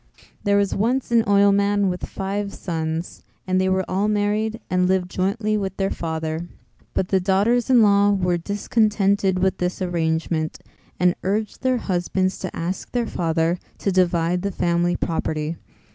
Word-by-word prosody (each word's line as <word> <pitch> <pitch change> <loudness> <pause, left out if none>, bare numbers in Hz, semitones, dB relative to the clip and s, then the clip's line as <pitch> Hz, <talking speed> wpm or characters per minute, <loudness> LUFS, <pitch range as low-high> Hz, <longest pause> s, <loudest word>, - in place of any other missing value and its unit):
There 200 -1 +3
was 200 -1 +1
once 240 +5 0
an 235 -1 +5
oilman 200 0 +3
with 180 -1 -3
five 200 +1 -3
sons 160 -1 -4 0.2
and 185 0 +1
they 190 - +1
were 190 0 +1
all 195 +3 0
married 215 +1 0
and 180 0 +1
lived 185 -1 0
jointly 210 +3 0
with 195 -2 -3
their 195 0 0
father. 160 0 -3 0.5
But 185 - 0
the 190 - +3
daughters 205 +7 +2
in 245 -3 +6
law 200 0 +5
were 180 -3 +1
discontented 200 0 +1
with 190 +1 +1
this 180 0 -2
arrangement 160 -3 -1 0.4
and 180 -1 +4
urged 210 +2 -2
their 255 -1 +2
husbands 185 -2 -1
to 185 - -5
ask 175 +3 -4
their 240 -1 0
father 165 -2 0 0.2
to 200 - -1
divide 175 -1 +2
the 200 - -1
family 175 -1 +1
property. 160 -1 -2
190 Hz, 160 wpm, -22 LUFS, 175-205 Hz, 0.5 s, in